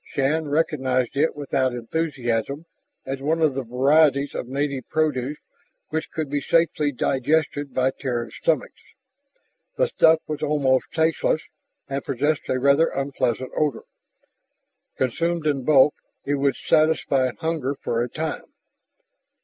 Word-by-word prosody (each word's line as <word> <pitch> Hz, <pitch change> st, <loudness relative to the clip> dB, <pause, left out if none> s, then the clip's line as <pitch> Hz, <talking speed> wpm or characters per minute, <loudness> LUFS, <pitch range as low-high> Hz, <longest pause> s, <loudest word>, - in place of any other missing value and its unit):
Shann 150 Hz, +3 st, -1 dB
recognized 135 Hz, -5 st, 0 dB
it 155 Hz, +4 st, +1 dB
without 135 Hz, -3 st, 0 dB
enthusiasm 130 Hz, +1 st, -2 dB, 0.4 s
as 135 Hz, 0 st, -4 dB
one 155 Hz, +4 st, 0 dB
of 155 Hz, -4 st, +3 dB
the 135 Hz, -, -2 dB
varieties 140 Hz, +3 st, +3 dB
of -, -, -4 dB
native 140 Hz, -1 st, -3 dB
produce 150 Hz, -3 st, 0 dB, 0.5 s
which 160 Hz, 0 st, -3 dB
could 155 Hz, -2 st, -3 dB
be 145 Hz, +1 st, -2 dB
safely 155 Hz, -1 st, +2 dB
digested 145 Hz, +2 st, 0 dB
by 130 Hz, 0 st, +2 dB
Terran 120 Hz, -5 st, -4 dB
stomachs. 155 Hz, +1 st, -1 dB, 1.0 s
The -, -, +4 dB
stuff 160 Hz, -, +4 dB
was 155 Hz, -1 st, -5 dB
almost 145 Hz, -4 st, +1 dB
tasteless 160 Hz, -1 st, +1 dB, 0.4 s
and 135 Hz, 0 st, -3 dB
possessed 145 Hz, +4 st, -1 dB
a 130 Hz, -, +1 dB
rather 140 Hz, +5 st, +4 dB
unpleasant 130 Hz, -2 st, -2 dB
odor. 150 Hz, -5 st, 0 dB, 1.1 s
Consumed 165 Hz, +6 st, -1 dB
in 140 Hz, -3 st, 0 dB
bulk 145 Hz, 0 st, +6 dB, 0.3 s
it 145 Hz, -, 0 dB
would 140 Hz, -1 st, +1 dB
satisfy 150 Hz, -4 st, +2 dB
hunger 160 Hz, -4 st, -2 dB
for 115 Hz, -, -1 dB
a 120 Hz, -, -2 dB
time. 160 Hz, 0 st, -4 dB
140 Hz, 130 wpm, -23 LUFS, 130-155 Hz, 1.1 s, bulk